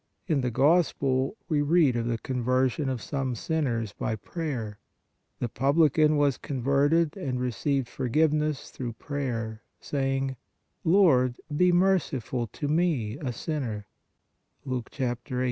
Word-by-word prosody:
In 155 Hz, -7 st, +1 dB
the 125 Hz, -, 0 dB
Gospel 135 Hz, -, +2 dB
we 150 Hz, -4 st, +1 dB
read 145 Hz, -3 st, +4 dB
of 120 Hz, -1 st, -1 dB
the 115 Hz, -1 st, 0 dB
conversion 130 Hz, +3 st, 0 dB
of 125 Hz, -4 st, -3 dB
some 135 Hz, -3 st, -2 dB
sinners 115 Hz, -7 st, -1 dB
by 110 Hz, -, -2 dB
prayer. 115 Hz, -, -5 dB, 0.6 s
The 120 Hz, -, -2 dB
publican 150 Hz, +4 st, +3 dB
was 145 Hz, -3 st, +2 dB
con 135 Hz, -3 st, -4 dB
verted 145 Hz, +4 st, +3 dB
and 135 Hz, -10 st, -3 dB
received 125 Hz, +2 st, -1 dB
forgiveness 150 Hz, +4 st, 0 dB
through 120 Hz, -3 st, -5 dB
prayer, 115 Hz, -5 st, -4 dB, 0.2 s
say 135 Hz, -1 st, -1 dB
ing: 135 Hz, -1 st, -2 dB, 0.5 s
"Lord, 155 Hz, -9 st, +4 dB, 0.2 s
be 180 Hz, +3 st, +4 dB
merciful 170 Hz, -, +1 dB
to 145 Hz, +8 st, -5 dB
me, 145 Hz, -7 st, 0 dB
a 135 Hz, -5 st, -3 dB
sinner" 120 Hz, -7 st, -4 dB, 0.8 s
(Luke 130 Hz, -3 st, -3 dB
18. 125 Hz, -3 st, -1 dB
135 Hz, 130 wpm, -27 LUFS, 125-155 Hz, 0.8 s, read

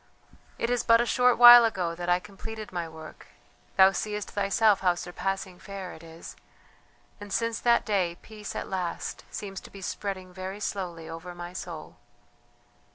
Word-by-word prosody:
"It 235 Hz, -, -1 dB
is 245 Hz, -1 st, +1 dB
but 230 Hz, -1 st, +5 dB
a 240 Hz, -, +2 dB
short 250 Hz, +1 st, +3 dB
while 240 Hz, 0 st, +11 dB
ago 185 Hz, -7 st, 0 dB
that 175 Hz, +1 st, -5 dB
I 175 Hz, 0 st, +4 dB
completed 210 Hz, +2 st, -9 dB
my 170 Hz, -2 st, -4 dB
work; 160 Hz, -1 st, -12 dB, 0.5 s
thou 190 Hz, 0 st, +8 dB
seest 210 Hz, +1 st, -4 dB
thyself 205 Hz, +1 st, +3 dB
how 180 Hz, -2 st, +2 dB
surpassing 185 Hz, +1 st, -4 dB
fair 195 Hz, -2 st, -7 dB
it 160 Hz, -, -13 dB
is, 165 Hz, 0 st, -11 dB, 0.8 s
and 205 Hz, -1 st, -10 dB
since 230 Hz, +2 st, 0 dB
that 235 Hz, -1 st, +3 dB
day 185 Hz, -5 st, 0 dB
peace 215 Hz, -2 st, -9 dB
at -, -, -4 dB
last 180 Hz, -3 st, -4 dB
seems 195 Hz, -2 st, -6 dB
to -, -, -13 dB
be 195 Hz, -1 st, -11 dB
spreading 185 Hz, -2 st, -5 dB
very 190 Hz, +2 st, -6 dB
slowly 175 Hz, -6 st, -4 dB
over 165 Hz, +2 st, -8 dB
my 175 Hz, 0 st, -8 dB
soul...." 170 Hz, -3 st, -8 dB
195 Hz, 165 wpm, -27 LUFS, 175-215 Hz, 0.8 s, while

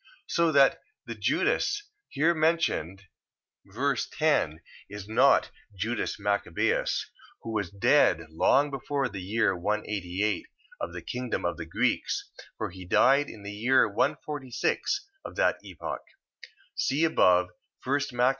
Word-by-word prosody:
So 170 Hz, -1 st, +2 dB
that 140 Hz, -1 st, +5 dB, 0.3 s
the -, -, -5 dB
Judas 415 Hz, 0 st, 0 dB, 0.3 s
here 160 Hz, +5 st, +2 dB
mentioned, 155 Hz, -, 0 dB, 0.6 s
ver. 130 Hz, +8 st, -1 dB
10, 125 Hz, -, 0 dB, 0.3 s
is 100 Hz, 0 st, -8 dB
not 130 Hz, +5 st, +4 dB, 0.3 s
Judas 110 Hz, +4 st, -2 dB
Machabeus, 100 Hz, 0 st, 0 dB, 0.4 s
who 115 Hz, -, -5 dB
was 100 Hz, -5 st, -1 dB
dead 100 Hz, -, +3 dB
long 140 Hz, -, +3 dB
before 135 Hz, 0 st, -2 dB
the 100 Hz, -4 st, -6 dB
year 100 Hz, +1 st, +1 dB
188 100 Hz, +1 st, -2 dB, 0.3 s
of 85 Hz, -, -4 dB
the 85 Hz, -2 st, -7 dB
kingdom 125 Hz, +5 st, -3 dB
of -, -, -1 dB
the -, -, -6 dB
Greeks, -, -, -1 dB, 0.3 s
for -, -, -3 dB
he 95 Hz, +1 st, -10 dB
died 135 Hz, +10 st, +4 dB
in 105 Hz, -, -11 dB
the 100 Hz, -, -6 dB
year 120 Hz, +6 st, +3 dB
146 130 Hz, -, -1 dB, 0.2 s
of -, -, -8 dB
that -, -, +2 dB
epoch, -, -, -6 dB, 0.7 s
(see 140 Hz, +4 st, 0 dB
above 90 Hz, -, +4 dB, 0.3 s
1 140 Hz, +3 st, +1 dB
Mac. 125 Hz, +1 st, +4 dB
115 Hz, 130 wpm, -28 LUFS, 95-140 Hz, 0.7 s, that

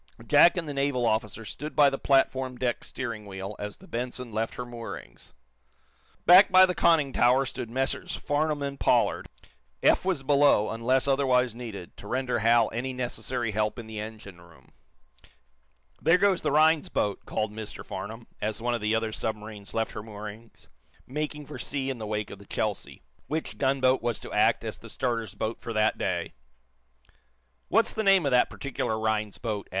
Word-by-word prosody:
Jack 175 Hz, -, +6 dB
and 165 Hz, -3 st, -2 dB
the 145 Hz, -, -4 dB
naval 140 Hz, -3 st, 0 dB
officer 110 Hz, -1 st, -1 dB
stood 150 Hz, +7 st, -7 dB
by 145 Hz, -2 st, +6 dB
the 135 Hz, 0 st, -1 dB
platform 130 Hz, -2 st, +1 dB
deck 120 Hz, -1 st, -1 dB
steering 115 Hz, -5 st, -5 dB
wheel 95 Hz, +1 st, -6 dB
as 105 Hz, 0 st, -5 dB
the -, -, -16 dB
"Benson" 125 Hz, 0 st, -4 dB
left 110 Hz, +1 st, -2 dB
her 125 Hz, -, -5 dB
moorings. 115 Hz, -, -9 dB, 0.9 s
Back 185 Hz, +3 st, +8 dB
by 185 Hz, 0 st, +8 dB
the 180 Hz, -, -1 dB
conning 155 Hz, -7 st, +3 dB
tower 125 Hz, +3 st, +4 dB
stood 120 Hz, -2 st, -5 dB
Messrs. 130 Hz, +3 st, -1 dB
Farnum 145 Hz, 0 st, -1 dB
and 140 Hz, 0 st, -4 dB
Pollard. -, -, +2 dB, 0.5 s
Eph -, -, +4 dB
was 180 Hz, -7 st, -1 dB
below, 140 Hz, -6 st, +4 dB
until 130 Hz, +4 st, +2 dB
otherwise 125 Hz, -3 st, +2 dB
needed, 110 Hz, -7 st, -8 dB
to 100 Hz, -, -11 dB
render 125 Hz, 0 st, -1 dB
Hal 115 Hz, +1 st, +4 dB
any 130 Hz, +3 st, -3 dB
necessary 125 Hz, -2 st, -2 dB
help 105 Hz, +1 st, -1 dB
in 120 Hz, -, -7 dB
the 110 Hz, -1 st, -7 dB
engine 105 Hz, -4 st, -9 dB
room. 80 Hz, -6 st, -19 dB, 1.3 s
"There 165 Hz, +3 st, +5 dB
goes 195 Hz, -1 st, +2 dB
the -, -, 0 dB
Rhinds 155 Hz, +1 st, +4 dB
boats" 100 Hz, -1 st, -1 dB
called 110 Hz, -1 st, -2 dB
Mr 110 Hz, -1 st, -7 dB
Farnum, 115 Hz, +2 st, -7 dB, 0.2 s
as 105 Hz, +1 st, -2 dB
one 120 Hz, +1 st, -1 dB
of 120 Hz, -, -2 dB
the 105 Hz, +1 st, +1 dB
other 110 Hz, 0 st, -1 dB
submarines 105 Hz, -2 st, -5 dB
left 115 Hz, 0 st, 0 dB
her -, -, -6 dB
moorings, 110 Hz, +1 st, -10 dB, 0.4 s
making 150 Hz, +2 st, -4 dB
for 150 Hz, -, -9 dB
sea 135 Hz, -2 st, -2 dB
in 125 Hz, -, -6 dB
the 110 Hz, -, -5 dB
wake 105 Hz, 0 st, -3 dB
of 100 Hz, -, -9 dB
the 100 Hz, -, -15 dB
"Chelsea," 105 Hz, -3 st, -3 dB, 0.2 s
which 155 Hz, +1 st, -4 dB
gunboat 130 Hz, -1 st, +2 dB
was 120 Hz, -2 st, -1 dB
to -, -, -8 dB
act -, -, +3 dB
as -, -, -5 dB
the -, -, -12 dB
starter's 115 Hz, -5 st, -2 dB
boat 110 Hz, +2 st, -3 dB
for 115 Hz, -, -5 dB
that 110 Hz, 0 st, +1 dB
day. -, -, -2 dB, 1.3 s
"What's -, -, +3 dB
the 220 Hz, -, -1 dB
name 195 Hz, -5 st, +4 dB
of 140 Hz, -, +1 dB
that 125 Hz, -1 st, +4 dB
particular 120 Hz, -5 st, -3 dB
Rhinds 110 Hz, -2 st, -1 dB
boat?" 105 Hz, -4 st, -4 dB
120 Hz, 180 wpm, -27 LUFS, 110-140 Hz, 1.3 s, Back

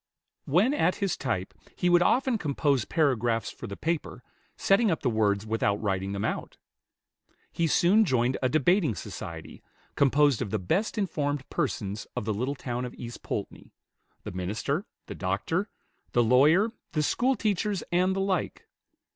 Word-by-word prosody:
When 190 Hz, -, +3 dB
at 180 Hz, -, +2 dB
his 195 Hz, -3 st, -1 dB
type, 100 Hz, -8 st, -3 dB, 0.2 s
he 180 Hz, -, 0 dB
would 175 Hz, 0 st, +5 dB
often 255 Hz, +3 st, +2 dB
compose 140 Hz, -, +1 dB
paragraphs 120 Hz, -7 st, +1 dB
for -, -, -9 dB
the 100 Hz, -, -7 dB
paper, 165 Hz, -6 st, -3 dB, 0.3 s
setting 205 Hz, +3 st, +3 dB
up 165 Hz, -, 0 dB
the 125 Hz, -, +2 dB
words 105 Hz, -2 st, +1 dB
without 110 Hz, -2 st, +1 dB
writing 95 Hz, -2 st, -1 dB
them 100 Hz, +2 st, -2 dB
out. -, -, -4 dB, 0.9 s
He 170 Hz, -, 0 dB
soon 190 Hz, +7 st, +4 dB
joined 130 Hz, -, +1 dB
a 130 Hz, -, +2 dB
debating 155 Hz, -, +2 dB
society, 80 Hz, -2 st, -8 dB, 0.3 s
composed 140 Hz, -2 st, +3 dB
of 115 Hz, -, -2 dB
the 110 Hz, -, 0 dB
best 175 Hz, -, -1 dB
informed 145 Hz, -8 st, -1 dB
persons 105 Hz, -, -2 dB
of -, -, -3 dB
the 110 Hz, -, 0 dB
little 125 Hz, +7 st, -2 dB
town 125 Hz, -2 st, -4 dB
of 125 Hz, -, -6 dB
East 120 Hz, -1 st, -8 dB
Poultney, -, -, -6 dB, 0.5 s
the -, -, -6 dB
minister, 110 Hz, -, -2 dB, 0.2 s
the -, -, -7 dB
doctor, 100 Hz, -, -2 dB, 0.4 s
the 120 Hz, -, +4 dB
lawyer, 150 Hz, -, +4 dB, 0.2 s
the 150 Hz, -, +1 dB
schoolteachers, 210 Hz, -, 0 dB
and 185 Hz, +2 st, +2 dB
the 195 Hz, -, 0 dB
like. 195 Hz, -2 st, -2 dB
140 Hz, 155 wpm, -27 LUFS, 110-180 Hz, 0.9 s, would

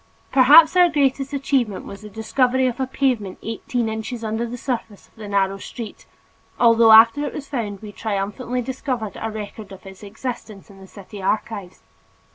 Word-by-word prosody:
Perhaps 300 Hz, +6 st, +7 dB
our 360 Hz, -1 st, +6 dB
greatest 275 Hz, -2 st, 0 dB
achievement 270 Hz, -7 st, -1 dB
was 200 Hz, -, -10 dB
the 210 Hz, -, -10 dB
discovery 250 Hz, +5 st, 0 dB
of 245 Hz, -1 st, -2 dB
a 265 Hz, -, -1 dB
pavement 250 Hz, -8 st, -1 dB
eighteen 225 Hz, +1 st, -3 dB
inches 220 Hz, +2 st, -5 dB
under 220 Hz, +2 st, -2 dB
the 245 Hz, +2 st, -6 dB
surface 230 Hz, -5 st, -5 dB
in 220 Hz, -, -15 dB
a 210 Hz, -, -7 dB
narrow 195 Hz, -1 st, 0 dB
street, 225 Hz, 0 st, -9 dB, 0.5 s
although 230 Hz, -1 st, +6 dB
after 230 Hz, +6 st, +7 dB
it 290 Hz, -, -4 dB
was 285 Hz, -1 st, -7 dB
found 220 Hz, -7 st, -4 dB
we 210 Hz, -, -8 dB
triumphantly 220 Hz, +5 st, -3 dB
discovered 250 Hz, -4 st, -4 dB
a 225 Hz, -, -2 dB
record 210 Hz, -1 st, -8 dB
of 195 Hz, +1 st, -12 dB
its 190 Hz, 0 st, -12 dB
existence 215 Hz, -1 st, -7 dB
in 195 Hz, -, -16 dB
the 190 Hz, -, -13 dB
city 200 Hz, +1 st, -11 dB
archives. 200 Hz, -1 st, -3 dB
225 Hz, 175 wpm, -21 LUFS, 205-255 Hz, 0.5 s, Perhaps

